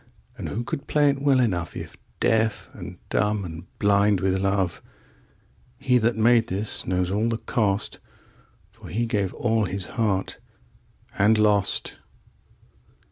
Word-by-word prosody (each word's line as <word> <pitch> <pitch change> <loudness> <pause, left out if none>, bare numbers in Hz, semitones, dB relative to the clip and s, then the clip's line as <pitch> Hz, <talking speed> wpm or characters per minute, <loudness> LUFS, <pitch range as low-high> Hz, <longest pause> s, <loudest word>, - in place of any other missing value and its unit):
11And - - -4
who 115 +4 -3
could 140 +4 -5
play 145 -1 +4
it 140 0 -5
well 140 -2 +4
enough12If 90 -9 -2 0.2
deaf 110 -1 +1
and - - -9
dumb 105 -1 0
and 85 +1 -8
blind 100 -1 +3
with 95 0 +1
love?13He 110 +6 -3
that 115 +2 +2
made 115 +1 +4
this 100 +2 -3
knows 90 0 0
all 110 +4 +1
the 115 - -1
cost,14For 105 -3 -5
he 115 +6 0
gave 100 -4 -1
all 115 -2 +1
his 95 0 -3
heart 100 -4 -1 0.8
and 105 +2 +5
lost. 105 -2 +1
105 Hz, 130 wpm, -24 LUFS, 95-115 Hz, 0.8 s, and